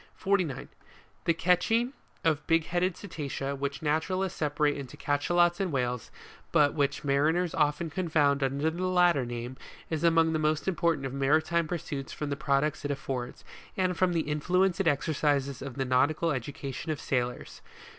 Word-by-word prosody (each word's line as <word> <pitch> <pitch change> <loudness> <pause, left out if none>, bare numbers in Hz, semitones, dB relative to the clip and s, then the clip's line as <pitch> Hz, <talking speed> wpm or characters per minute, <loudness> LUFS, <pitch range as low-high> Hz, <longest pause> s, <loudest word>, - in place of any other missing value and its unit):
49. 185 -9 0 0.6
The 170 - +4
catching 225 - +2 0.3
of 155 -2 +1
big 165 -1 +3
headed 175 +1 0
cetacea, 140 -7 -4
which 140 +2 -4
naturalists 180 +5 -1
separate 150 -1 +1
into 140 -3 -8
Cachalots 175 +5 +2
and 190 -3 -1
Whales, 125 -3 -2 0.4
but 145 -1 +4
which 140 -2 0
mariners 155 +5 +2
often 150 +2 +1
confound 155 -5 +2
under 140 +4 0
the 180 +3 -2
latter 175 -8 +3
name, 120 +2 -5 0.3
is 160 -1 -1
among 165 -1 +4
the 155 - +1
most 155 +1 0
important 170 -6 +1
of 135 - -4
maritime 155 +4 +2
pursuits 145 -5 -4
from 150 -1 -4
the - - 0
products 140 +1 0
it 145 - -2
affords, 130 -3 -4 0.3
and 185 -1 +1
from 180 0 +2
the 165 -3 0
in 150 0 -1
fluence 185 +2 +2
it 195 - +1
exercises 140 -2 +1
on 135 -1 -6
the 135 +1 -2
nautical 145 +6 +2
education 140 +3 -4
of 150 - -3
sailors. 125 -2 -3
150 Hz, 165 wpm, -29 LUFS, 140-170 Hz, 0.6 s, The